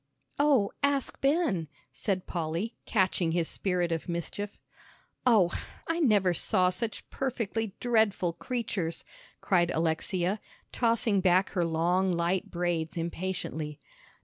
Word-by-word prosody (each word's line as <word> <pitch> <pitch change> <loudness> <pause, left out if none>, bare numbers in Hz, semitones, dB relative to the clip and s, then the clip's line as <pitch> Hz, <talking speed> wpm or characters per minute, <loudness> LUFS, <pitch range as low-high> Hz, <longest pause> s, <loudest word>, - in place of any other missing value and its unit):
"Oh, 275 -9 +4
ask 280 -1 0
Ben," 275 - +2 0.2
said 190 -3 -2
Polly, 170 +7 -3
catching 185 -5 +1
his 170 -2 +1
spirit 180 -3 -1
of 165 +1 -2
mischief. 185 +4 -4 0.7
"Oh, 205 -8 +5 0.4
I 330 +1 0
never 205 - +4
saw 180 +2 +3
such 215 +4 -4
perfectly 225 -5 -2
dreadful 220 -7 +2
creatures," 195 -5 -3 0.4
cried 175 -3 +3
Alexia, 175 +5 0 0.3
tossing 230 -4 +2
back 185 +1 +4
her 175 - +1
long 175 +3 +2
light 175 +2 0
braids 175 0 -1
impatiently. 165 -3 -3
185 Hz, 115 wpm, -29 LUFS, 170-225 Hz, 0.7 s, Oh